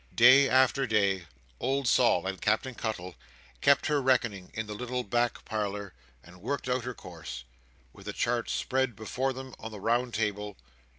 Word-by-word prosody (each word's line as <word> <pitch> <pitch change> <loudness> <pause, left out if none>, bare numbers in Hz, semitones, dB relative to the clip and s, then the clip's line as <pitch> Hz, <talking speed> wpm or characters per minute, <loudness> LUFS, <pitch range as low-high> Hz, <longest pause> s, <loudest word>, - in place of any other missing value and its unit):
Day 130 +3 +7
after 130 +1 +3
day, 100 -5 +1 0.3
old 135 +1 0
Sol - - +4
and 95 -1 -4
Captain 110 +5 +1
Cuttle 100 -6 -4 0.5
kept 140 0 +4
her 150 -2 +2
reckoning 120 -8 +1
in 110 - -2
the 105 - -6
little 125 +3 -3
back 120 +2 -1
parlour 105 -2 -3 0.3
and 90 +3 -16
worked 130 +5 -3
out 125 -1 0
her 125 -1 -4
course, 80 -10 -8 0.5
with - - -14
the - - -3
chart - - -1
spread 130 -3 0
before 125 +5 -2
them 130 0 -8
on 110 - -6
the 105 -2 -9
round 120 +3 0
table. 105 -2 -2
115 Hz, 170 wpm, -29 LUFS, 100-130 Hz, 0.5 s, Day